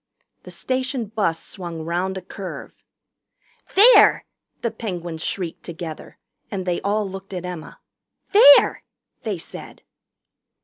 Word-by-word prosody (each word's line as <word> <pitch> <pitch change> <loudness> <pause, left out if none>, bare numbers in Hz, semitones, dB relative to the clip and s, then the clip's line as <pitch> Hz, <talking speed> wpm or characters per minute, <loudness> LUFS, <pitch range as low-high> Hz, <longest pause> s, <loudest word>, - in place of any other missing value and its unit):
The - - -12
station 255 -1 -2
bus 200 -6 -1
swung 170 -4 -6
round 180 +3 -2
a 185 - -7
curve. 190 0 -9 0.9
"There!" 445 +6 +7 0.4
the 235 - 0
Penguins 175 -7 -6
shrieked 175 -4 -4
together. 165 -2 -8 0.3
And 190 -3 -4
they 175 -1 -1
all 205 +1 0
looked 195 0 -8
at 180 0 -5
Emma. 180 -3 -8 0.5
"There!" 285 -9 +7 0.4
they - - -3
said. - - -10
190 Hz, 120 wpm, -22 LUFS, 175-220 Hz, 0.9 s, There